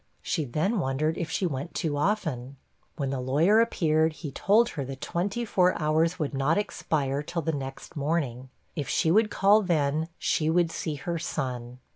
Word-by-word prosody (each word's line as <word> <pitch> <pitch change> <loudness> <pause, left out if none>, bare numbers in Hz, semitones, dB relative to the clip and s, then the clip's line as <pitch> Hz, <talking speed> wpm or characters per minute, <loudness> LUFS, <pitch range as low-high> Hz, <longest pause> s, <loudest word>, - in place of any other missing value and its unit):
She 160 -5 -1
then 170 - 0
wondered 155 +2 0
if 165 -2 -3
she 185 - -1
went 145 0 -4
too 155 -3 -1
often. 145 - -1 0.4
When 140 -4 -2
the 135 - -2
lawyer 160 - +4
appeared, 160 -7 +2
he 155 -2 -7
told 215 - +3
her 145 -4 -4
the 135 +1 -6
twenty 195 - -2
four 185 -4 +2
hours 160 +3 +2
would 150 -5 -2
not 135 +4 +1
expire 145 -9 -1
till 165 +2 -4
the 160 - 0
next 135 +1 -6
morning; 140 -4 -2 0.3
if 145 -5 -3
she 160 - +2
would 215 +3 +4
call 205 +2 +4
then, 155 -4 +1
she 155 0 +1
would 170 0 +2
see 155 -2 -3
her 170 +4 -3
son. 125 -6 -4
155 Hz, 180 wpm, -27 LUFS, 140-175 Hz, 0.4 s, lawyer